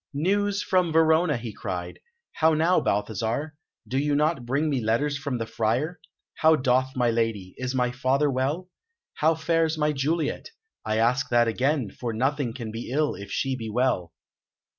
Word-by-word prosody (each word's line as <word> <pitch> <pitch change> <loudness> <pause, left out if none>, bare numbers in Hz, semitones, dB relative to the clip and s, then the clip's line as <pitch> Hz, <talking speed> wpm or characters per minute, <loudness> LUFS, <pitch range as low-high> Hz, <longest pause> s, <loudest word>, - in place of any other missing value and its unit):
"News 200 +6 +1
from 180 -3 +2
Verona!" 160 -1 +3
he 115 -2 -6
cried. 90 -4 -5 0.3
"How 160 0 +3
now, 165 +4 +3
Balthasar? 110 +8 -1 0.3
Do 130 - 0
you 145 0 +1
not 150 -4 +1
bring 140 +5 +1
me 140 -4 0
letters 120 +7 +1
from 140 -2 -3
the 115 - -3
Friar? 120 +10 -1 0.4
How 160 0 +5
doth 130 -1 +1
my 120 -2 +2
lady? 115 -5 -1
Is 130 0 -3
my 125 -1 +1
father 135 +3 +1
well? 140 +8 -1 0.5
How 160 +2 +2
fares 160 0 +1
my 150 0 +2
Juliet? 150 - -1 0.3
I 110 0 -1
ask 125 +3 +2
that 120 -1 +4
again, 130 -1 0
for 120 -2 -5
nothing 135 +2 0
can 115 -2 -6
be 115 +2 -6
ill 150 +3 +1
if 100 - -9
she 135 -1 -1
be 115 -3 -6
well." 110 -7 0
130 Hz, 170 wpm, -26 LUFS, 115-155 Hz, 0.5 s, How